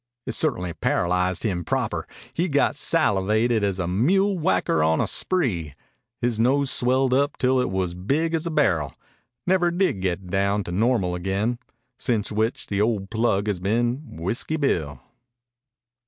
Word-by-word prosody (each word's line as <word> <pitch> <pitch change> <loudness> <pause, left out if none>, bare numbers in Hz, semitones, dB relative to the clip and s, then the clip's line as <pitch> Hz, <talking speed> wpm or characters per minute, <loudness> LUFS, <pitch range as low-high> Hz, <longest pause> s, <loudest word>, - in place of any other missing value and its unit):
It - - -3
ce'tainly 90 - +1
paralyzed 90 +1 0
him 90 -6 -1
proper. - - -2 0.3
He 175 +3 0
got 145 0 +2
salivated 110 - +2
as 100 -2 0
a 90 -3 -2
mule 190 - +2
whacker 90 - +1
on 80 +1 +2
a - - +2
spree. 95 - 0 0.4
His 120 -2 -1
nose 135 +3 +2
swelled 130 +1 +2
up 140 +2 +1
till 130 0 +2
it - - -1
was 95 -2 -2
big 140 - -1
as 165 +1 -1
a - - -1
barrel 90 - +1 0.5
never 180 -1 +3
did 175 - 0
get 95 0 -2
down 100 +1 +1
to 90 - -7
normal 100 -2 +1
again. 95 +7 -2 0.4
Since 110 -4 -1
which 110 +3 -1
the 100 0 -1
ol' 105 -3 0
plug 110 -1 0
has 105 -4 -1
been 120 - -1
Whiskey 115 - -2
Bill." 80 - -1
110 Hz, 155 wpm, -24 LUFS, 95-135 Hz, 0.5 s, never